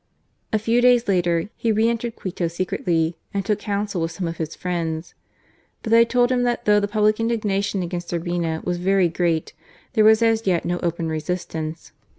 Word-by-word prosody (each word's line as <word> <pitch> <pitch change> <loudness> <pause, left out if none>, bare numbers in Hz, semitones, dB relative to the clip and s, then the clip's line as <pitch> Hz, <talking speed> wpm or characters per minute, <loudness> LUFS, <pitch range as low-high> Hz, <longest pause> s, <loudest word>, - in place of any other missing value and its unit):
A 220 - +3
few 230 +3 +1
days 245 -1 +4
later 175 0 +1
he 230 - 0
re 220 +1 +3
entered 235 0 -2
Quito 180 -2 -3
secretly 165 -1 -1 0.2
and 195 -1 -1
took 210 0 0
counsel 205 -3 -2
with 165 - 0
some 175 +1 -4
of 165 - -5
his 160 -1 -4
friends. 170 -2 -3 0.7
But 225 - -4
they 230 0 +7
told 245 +1 +2
him 250 -1 +2
that 245 -1 -1
though 210 0 +5
the 205 - -1
public 215 +1 +2
indignation 205 -4 0
against 175 0 -5
Urbina 170 -2 -2
was 175 0 -1
very 190 -1 +3
great 165 -1 -1 0.4
there 220 - +4
was 220 +1 +6
as 225 -2 +2
yet 175 -3 +1
no 175 0 -1
open 170 -1 -2
resistance. 160 0 -4
190 Hz, 185 wpm, -22 LUFS, 170-220 Hz, 0.7 s, they